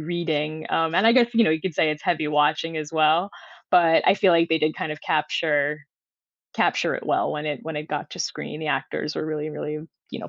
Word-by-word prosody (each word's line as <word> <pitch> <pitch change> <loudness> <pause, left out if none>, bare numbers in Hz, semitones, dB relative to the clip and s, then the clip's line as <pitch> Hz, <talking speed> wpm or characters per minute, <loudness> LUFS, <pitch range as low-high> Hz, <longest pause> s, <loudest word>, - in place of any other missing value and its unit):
reading, 155 -2 -3
um, 165 0 0
and 195 +5 +4
I 230 - +7
guess, 240 -2 +4
you 230 - +5
know, - - +3
you 160 0 0
could 185 -2 -4
say 155 +1 +2
it's 150 0 -5
heavy 155 -3 0
watching 150 +2 +1
as 155 +1 -5
well, 160 +5 +3 0.4
but 165 -2 +5
I 195 - +6
feel 190 -3 +3
like 165 0 +3
they 160 - +2
did 155 0 0
kind 155 - -4
of 150 - -9
capture 150 -1 0 0.7
capture - - +1
it - - -5
well - - 0
when 150 0 -4
it 145 -3 -3
when 160 -1 -6
it 150 +1 -5
got - - -4
to - - -9
screen, 150 - -5
the 155 - -5
actors 135 +2 -2
were 155 - -3
really, 155 0 -4
really, 150 0 -5 0.3
you - - -7
know, - - -8
155 Hz, 240 wpm, -23 LUFS, 150-165 Hz, 0.7 s, I